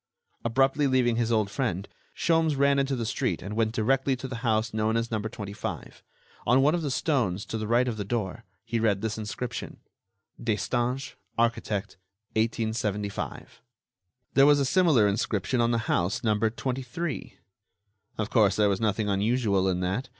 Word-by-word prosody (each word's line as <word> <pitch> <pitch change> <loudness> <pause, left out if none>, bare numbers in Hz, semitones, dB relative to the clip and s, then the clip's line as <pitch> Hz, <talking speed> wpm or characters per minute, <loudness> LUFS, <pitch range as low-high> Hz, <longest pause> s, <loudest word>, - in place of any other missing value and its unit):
Abruptly 135 +4 +2
leaving 125 -3 +2
his 120 -1 +1
old 110 -3 +1
friend, 100 -8 -2 0.3
Sholmes 165 -2 +2
ran 140 0 +4
into 135 0 0
the 120 -2 -2
street 130 +2 -1
and 105 +1 -5
went 110 -1 +1
directly 135 +4 +1
to 130 +1 -6
the 125 -2 -5
house 110 -1 0
known 110 +1 +1
as 115 0 -2
number 110 0 -2
25. 100 -3 -6 0.5
On 125 +4 +5
one 150 +2 +4
of 175 - 0
the 150 - -2
stones, 120 - 0
to - - -5
the 110 -1 -2
right 120 +3 +3
of 115 -3 -2
the 105 - -2
door, 100 -3 -3 0.2
he 115 - -1
read 105 -3 +1
this 110 0 -2
inscription: 110 +3 -5 0.7
"Destange, 120 +4 -1 0.2
architect, 110 -4 -1 0.4
1875." 110 -3 -2 0.7
There 140 +1 +6
was 145 -1 +6
a 140 - +2
similar 150 - +4
inscription 105 +3 0
on 115 - +3
the 115 -1 0
house 90 +3 0
numbered 110 0 +1
23. 130 +5 -4 0.8
Of 110 0 -2
course, 105 -5 +4
there 105 -1 +3
was 100 0 0
nothing 110 -1 +1
unusual 100 -1 +1
in 90 -1 0
that. 95 +9 -2
115 Hz, 165 wpm, -27 LUFS, 105-130 Hz, 0.8 s, There